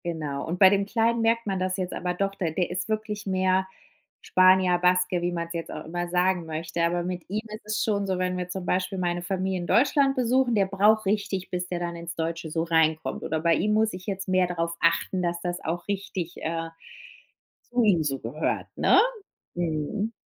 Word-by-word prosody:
Genau, 155 -5 -3
und 170 +2 -2
bei 190 - +9
dem 200 0 +2
Kleinen 230 +2 +1
merkt 230 +1 +2
man 195 -2 -1
das 185 0 -1
jetzt 185 -1 -3
aber 180 0 -2
doch, 195 +1 -1
de 170 -5 -2
der 180 +1 -1
ist 180 +4 -3
wirklich 215 -1 -3
mehr 190 0 +2 0.5
Spanier, 185 -1 +4
Baske, 180 0 +2
wie 175 0 0
man 170 -1 -3
es 170 - -8
jetzt 165 -1 -5
auch - - -7
immer 175 +2 -3
sagen 180 0 +1
möchte, 160 +1 -3
aber 175 +1 +1
mit 180 -1 -4
ihm 210 +3 -1
ist 215 0 -9
es 215 - 0
schon 200 -2 0
so, 190 -1 0
wenn 180 0 -1
wir 180 0 -4
zum 185 0 -5
Beispiel 185 +2 -1
meine 175 -1 -1
Familie 185 +1 -2
in 175 - -5
Deutschland 275 +2 +3
besuchen, 250 -1 +2
der 200 -2 +3
braucht 210 +3 +3
richtig, 200 -2 -1
bis 180 0 -2
der 180 -1 -3
dann 170 0 -3
ins 170 0 -7
Deutsche 165 0 -3
so 165 +1 0
reinkommt. 160 -1 +1
Oder 160 - -1
bei 165 +1 +3
ihm 210 +1 +1
muss 220 0 +2
ich 180 0 -8
jetzt 195 -1 -3
mehr 185 -1 +3
darauf 170 -1 -2
achten, 170 +2 +1
dass 170 0 -1
das 175 0 -4
auch 170 +2 -3
richtig, 195 -3 -4
äh, 165 0 -3 0.9
zu 245 0 -1
ihm 185 -6 +4
so 135 -2 -1
gehört, 140 +8 -2
ne? - - +5 0.6
Mhm. 175 +6 -2
180 Hz, 215 wpm, -26 LUFS, 170-200 Hz, 0.9 s, bei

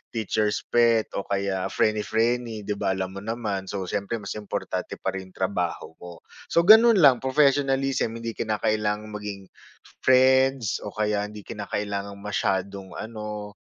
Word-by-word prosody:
teacher's 105 -1 0
pet 115 -2 +3
o 100 - -7
kaya 100 -1 -1
frienny-frienny, 110 +1 0
'di 100 0 -3
ba? 95 -2 0
Alam 95 +1 -4
mo - - -11
naman. 105 -4 -3
So, 100 0 -3
siyempre 100 +4 -2
mas 100 +2 -5
importante 105 - -4
pa - - -1
rin 95 -1 -6
trabaho 90 -4 -2
mo. 85 -1 -11 0.2
So, 170 - +3
ganun 220 +4 +8
lang 135 -7 +6
professionalism. 135 -3 +2
Hindi 115 0 -4
kinakailangang 105 -1 -1
maging 105 -1 -6 0.6
friends 130 -2 +4
o 105 - -7
kaya 105 -1 0
hindi 105 0 -10
kinakailangang 100 -1 -4
masyadong 95 -1 -2
ano 105 -2 -6
105 Hz, 140 wpm, -25 LUFS, 100-115 Hz, 0.6 s, ganun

